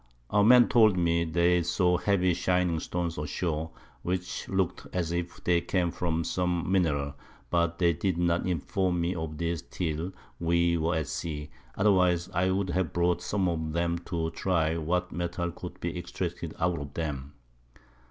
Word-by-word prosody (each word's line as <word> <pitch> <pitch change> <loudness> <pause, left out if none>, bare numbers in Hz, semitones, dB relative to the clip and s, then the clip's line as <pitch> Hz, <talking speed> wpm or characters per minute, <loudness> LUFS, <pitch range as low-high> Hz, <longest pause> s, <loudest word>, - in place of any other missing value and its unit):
Our 105 0 +4
Men 120 +2 +7
told 110 -5 +5
me 85 -1 +2
they 85 +2 +3
saw 90 +1 +2
heavy 95 -3 +2
shining 90 -1 +1
Stones 85 -1 -3
ashore, 80 +1 -2 0.3
which 90 0 -3
look'd 95 -2 -1
as 85 -3 -1
if 85 0 -4
they 85 -1 +3
came 90 -2 0
from 85 -1 -1
some 90 +1 -1
Mineral, 75 -7 +1 0.4
but 85 -1 +1
they 85 -1 +3
did 85 +2 -1
not 85 0 +1
inform 90 +1 0
me 85 +2 0
of 80 -3 -5
this 85 0 -1
till 85 +1 -3 0.3
we 85 0 +2
were 85 +1 0
at 80 -2 0
Sea, 75 -3 -4 0.2
otherwise 90 -3 +3
I 90 +1 +2
would 95 -1 0
have 95 -3 -1
brought 85 0 +1
some 95 +1 0
of 80 -2 -2
'em 85 0 0
to 85 -2 -2
have 80 - -3
try'd 80 -3 +1
what 90 +3 -1
Mettal 85 0 -2
could 90 +1 -9
be 85 0 -3
extracted 85 -1 -4
out 85 -1 +1
of 70 -1 -8
'em. 75 -4 -3
85 Hz, 170 wpm, -28 LUFS, 80-90 Hz, 0.4 s, Men